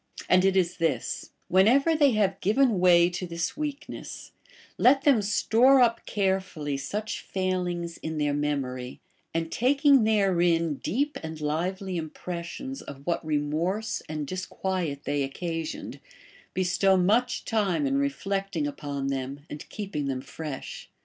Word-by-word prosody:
And 185 0 +5
it 195 0 +3
is 180 -2 +1
this: 160 -8 -1 0.2
whenever 250 - +4
they 290 -4 +4
have 195 -3 +1
given 220 +1 +3
way 175 -1 +6
to 180 +1 -4
this 170 0 -3
weakness, 295 -1 -6 0.5
let 270 +2 +5
them 275 -7 +5
store 235 +6 +4
up 235 -2 +2
careful 190 -5 -1
ly 145 -1 -1
such 210 +11 -4
failings 180 -3 -2
in 160 0 -5
their 145 -1 +1
memory, 135 -4 -2 0.3
and 165 0 -2
taking 275 +1 +4
therein 175 -7 +2
deep 285 - -1
and 160 0 -6
liΛ^ely 180 +5 -2
impressions 175 - -6
of 140 0 -10
what 170 -1 -1
remorse 155 +8 -1
and 155 -1 -3
disquiet 185 -3 -3
they 145 0 -1
occasioned, 165 +4 -4 0.6
bestow 190 +1 +3
much 225 +7 +2
time 215 +2 +1
in 275 0 +1
reflecting 195 - -1
upon 145 -1 -4
them 135 +1 -4
and 150 - -8
keeping 195 -9 -4
them 130 -2 -2
fresh. 150 -1 -7
180 Hz, 135 wpm, -27 LUFS, 155-215 Hz, 0.6 s, way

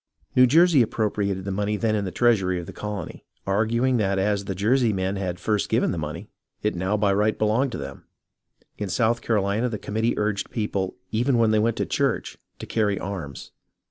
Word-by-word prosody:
New 125 0 +7
Jersey 165 +1 +5
appropriated 100 -4 -1
the 100 - -2
money 105 +2 -1
then 110 0 0
in 100 -1 -1
the 95 - -4
treasury 95 -7 +2
of 85 - -6
the - - -9
colony, 105 -4 -6 0.2
arguing 115 +6 +1
that 100 -3 +1
as 100 +1 0
the 95 - -3
Jersey 115 +4 +2
men 95 0 -1
had 95 -3 -3
first 105 -3 0
given - - +2
the - - -3
money - - -5 0.4
it 105 - +1
now 95 +4 -1
by 100 -1 +2
right 105 +2 +1
belonged 115 +5 +1
to - - -3
them. 70 0 -8 0.7
In 105 -2 -3
South 115 +6 +1
CaroHna 105 +2 0
the 110 - -3
committee 110 +3 -1
urged 105 -1 -1
people, 100 -4 -2 0.2
even 120 +3 +2
when 115 -2 +3
they 110 - +3
went 115 +1 +1
to - - 0
church, - - -1 0.2
to - - -7
carry 105 -3 0
arms. 90 -8 -6
105 Hz, 200 wpm, -24 LUFS, 95-115 Hz, 0.7 s, New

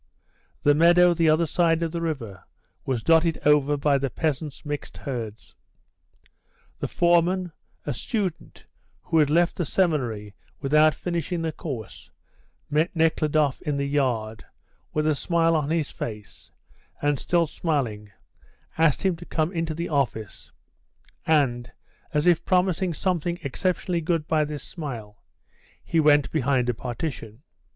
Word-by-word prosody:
The 145 - +5
meadow 175 +3 +5
the 165 -1 +2
other 155 +2 +3
side 165 0 +2
of 165 - -2
the 170 0 -3
river 125 - -4 0.4
was 125 -4 -1
dotted 165 0 +3
over 145 0 +4
by 140 -1 +2
the 135 0 -1
peasants' 150 +1 -3
mixed 145 0 -5
herds. 115 -5 -6 1.2
The - - -2
foreman, 175 +1 +2 0.3
a 145 - -2
student, 190 - -4 0.4
who 165 - +1
had 150 -2 +4
left 170 +3 +2
the 175 - 0
seminary 125 - -1 0.3
without 150 +2 +4
finishing 170 -1 -3
the 160 - -1
course, 135 - -7 0.6
met 155 +5 0
Nekhludoff 155 -3 +2
in 145 -1 -2
the 140 - -1
yard, 120 -6 -1 0.5
with 155 0 0
a 155 - +3
smile 165 +2 +1
on 150 -2 0
his 160 -2 0
face, 105 -3 -8 0.5
and, 145 -2 0
still 170 -1 +2
smiling, 125 -11 -2 0.7
asked 160 -4 +3
him 190 -3 +2
to 175 - -11
come 160 +1 0
into 165 -3 -2
the 170 +2 -3
office, 120 -8 -2 0.8
and, 130 -6 +2 0.4
as 150 -1 +1
if 175 -1 +4
promising 185 0 +1
something 175 0 -1
exceptionally 175 +4 -1
good 165 -1 -1
by 155 -1 +2
this 145 -2 -6
smile, 120 - -7 0.6
he 165 - 0
went 145 -4 +4
behind 130 -4 +1
a - - +2
partition. 120 -1 -6
155 Hz, 140 wpm, -25 LUFS, 135-170 Hz, 1.2 s, The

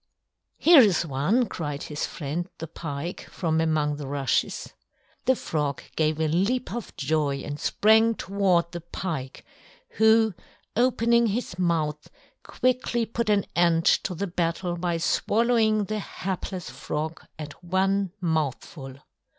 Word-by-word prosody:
"Here 335 -3 +7
is 190 -7 +3
one," 165 - +1
cried 145 -8 -5
his 150 -1 -3
friend, 165 +5 -4
the 165 - -5
Pike, 165 +1 -6
from 160 -2 0
among 155 -2 +1
the 145 -2 -6
rushes. 140 -1 -1 0.5
The 260 - +4
Frog 150 - -2
gave 155 0 +1
a 160 - +2
leap 200 +11 0
of 235 -4 -6
joy 145 -2 0
and 145 0 -5
sprang 220 +2 +4
toward 185 -5 +1
the 175 - -6
Pike, 160 -6 -5 0.5
who, 220 -1 +5 0.4
opening 235 -1 +3
his 205 -4 -3
mouth, 155 -4 0 0.3
quickly 250 -2 0
put 230 0 -2
an 205 -2 +3
end 170 -1 +3
to 185 - +2
the 200 - -2
battle 175 0 -2
by 175 -1 -1
swallowing 220 +4 +2
the 215 +2 -3
hapless 185 -5 -5
Frog 150 +4 -4
at 150 +2 -9
one 190 +1 +1
mouthful. 150 -4 -3
175 Hz, 135 wpm, -26 LUFS, 155-215 Hz, 0.5 s, Here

